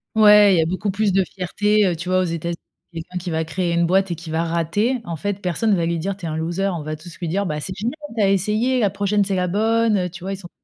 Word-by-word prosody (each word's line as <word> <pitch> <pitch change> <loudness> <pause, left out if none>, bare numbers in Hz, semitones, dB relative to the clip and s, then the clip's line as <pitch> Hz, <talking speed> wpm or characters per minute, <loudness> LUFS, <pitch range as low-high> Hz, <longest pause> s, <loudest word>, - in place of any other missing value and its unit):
Ouais, 210 -2 +7
il 180 - +3
y - - +4
a - - +1
beaucoup 185 +4 -2
plus 200 0 0
de 195 0 +3
fierté, 205 +3 +1
heu, 175 - 0
tu 170 +3 -6
vois, 185 0 +3
aux - - +2
États-Unis, 170 0 -3 0.4
quelqu'un 170 +2 -7
qui 180 0 -4
va 160 0 -1
créer 175 +1 -2
une 170 0 +2
boîte 190 +1 +2
et - - -1
qui 165 0 -10
va 160 +1 0
rater, 170 +10 0
en 170 - -4
fait, 200 +4 -3
personne 200 +4 0
va 170 -3 +1
lui 170 0 -1
dire: 195 +3 -3
«Tu 185 - -8
es - - -2
un 155 - -3
loser», 170 +5 -1
on 155 - -5
va 155 0 -4
tous 165 +1 -12
lui 170 -3 -3
dire: 200 +4 0
«Bah, 150 -3 -3
c'est 185 - -5
génial, 230 +7 -2 0.2
tu - - +2
as 195 - +4
essayé, 215 +6 +1
la 205 - +3
prochaine 205 +1 +1
c'est 195 -1 -1
la 180 0 0
bonne», 220 +3 +2
heu, 180 -1 -1
tu 180 +1 -10
vois, 195 - -2
ils - - -5
sont 175 -3 -11
185 Hz, 305 wpm, -21 LUFS, 170-205 Hz, 0.4 s, Ouais